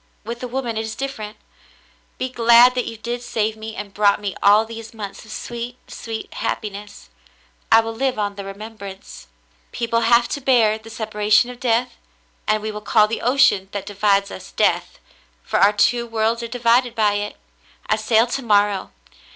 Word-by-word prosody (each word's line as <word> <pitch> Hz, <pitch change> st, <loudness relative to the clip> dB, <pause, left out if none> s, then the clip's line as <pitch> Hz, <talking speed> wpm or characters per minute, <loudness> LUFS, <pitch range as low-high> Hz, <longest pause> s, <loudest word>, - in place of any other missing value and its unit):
With 235 Hz, +2 st, -6 dB
a 250 Hz, -, -4 dB
woman 240 Hz, -2 st, -3 dB
it -, -, 0 dB
is 220 Hz, 0 st, -5 dB
different. 220 Hz, -6 st, -6 dB, 0.8 s
Be 255 Hz, -, -2 dB
glad 235 Hz, 0 st, +6 dB
that 250 Hz, -1 st, -2 dB
you 225 Hz, -, -6 dB
did 240 Hz, +2 st, -4 dB
save 220 Hz, -2 st, -1 dB
me 220 Hz, 0 st, -8 dB
and 200 Hz, 0 st, -7 dB
brought 205 Hz, -1 st, +3 dB
me 200 Hz, -2 st, -4 dB
all 210 Hz, +2 st, +5 dB
these 225 Hz, 0 st, -9 dB
months 205 Hz, -3 st, -7 dB
of 220 Hz, -, -13 dB
sweet, 240 Hz, +2 st, -6 dB
sweet 225 Hz, -1 st, -7 dB
happiness. 205 Hz, -, -5 dB, 0.6 s
I 225 Hz, -, +8 dB
will 225 Hz, 0 st, -5 dB
live 260 Hz, +2 st, -1 dB
on 205 Hz, -1 st, -1 dB
the 200 Hz, 0 st, -7 dB
remembrance. 200 Hz, -1 st, -10 dB, 0.4 s
"People 230 Hz, -1 st, -1 dB
have 235 Hz, +1 st, +4 dB
to 285 Hz, -, -3 dB
bear 230 Hz, -5 st, +3 dB
the 220 Hz, +1 st, -13 dB
separation 215 Hz, +1 st, +1 dB
of 245 Hz, -, -12 dB
death, 245 Hz, 0 st, 0 dB, 0.5 s
and 215 Hz, 0 st, +1 dB
we 215 Hz, -, -3 dB
will 210 Hz, 0 st, -7 dB
call 210 Hz, 0 st, +4 dB
the 225 Hz, -, -4 dB
ocean 245 Hz, -7 st, +3 dB
that 200 Hz, -2 st, -4 dB
divides 200 Hz, 0 st, +1 dB
us -, -, -9 dB
Death, -, -, 0 dB, 0.5 s
for -, -, -1 dB
our 200 Hz, -, +6 dB
two 235 Hz, +3 st, +2 dB
worlds 225 Hz, +1 st, 0 dB
are 235 Hz, -, -4 dB
divided 240 Hz, 0 st, +2 dB
by 210 Hz, -2 st, +2 dB
it. 205 Hz, 0 st, -3 dB, 0.5 s
I 215 Hz, -, +2 dB
sail 220 Hz, +1 st, +3 dB
to 250 Hz, +3 st, -3 dB
morrow. 205 Hz, -4 st, +2 dB
220 Hz, 185 wpm, -21 LUFS, 210-235 Hz, 0.8 s, I